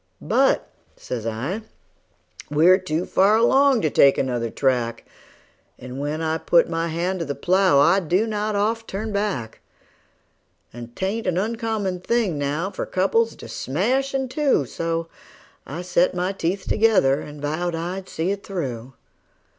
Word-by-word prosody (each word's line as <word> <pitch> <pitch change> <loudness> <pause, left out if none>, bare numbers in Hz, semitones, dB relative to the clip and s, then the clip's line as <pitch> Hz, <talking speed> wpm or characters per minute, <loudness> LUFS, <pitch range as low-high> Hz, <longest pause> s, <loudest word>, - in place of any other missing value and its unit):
"But," - - +2 0.3
says 115 -3 -5
I, 130 - -3 0.9
"we're 165 +6 +5
too 175 -1 -2
far 200 +3 +3
along 265 +2 +4
to 155 - +1
take 140 -1 +5
another 120 -3 -1
track, 125 -2 -1 0.7
And 125 +1 -8
when 150 +3 -3
I 160 0 -1
put 170 - +3
my 165 0 -2
hand 175 +3 -2
to 165 - -2
the 140 - -4
plow 185 -4 +3
I 170 +7 +5
do 185 +4 +1
not 215 -1 -2
oft 225 +3 0
turn 215 +3 -4
back; 195 - -2 1.1
And 120 0 -10
'tain't 200 +4 -2
an 180 -1 0
uncommon 215 -3 -2
thing 200 -6 0
now 150 +7 -2
for - - -5
couples 225 +5 +1
to - - -11
smash 255 - -1
in 265 -1 -1
two;" 280 - +1
And 135 - -7
so 165 0 -2 0.6
I 165 +7 -6
set 180 0 +2
my 180 +2 0
teeth 190 0 -3
together, 200 -11 +3
and 150 0 -10
vowed 160 +4 -2
I'd 180 +3 -5
see 165 +4 -1
it 200 0 -4
through. 130 - -5
180 Hz, 155 wpm, -23 LUFS, 145-205 Hz, 1.1 s, we're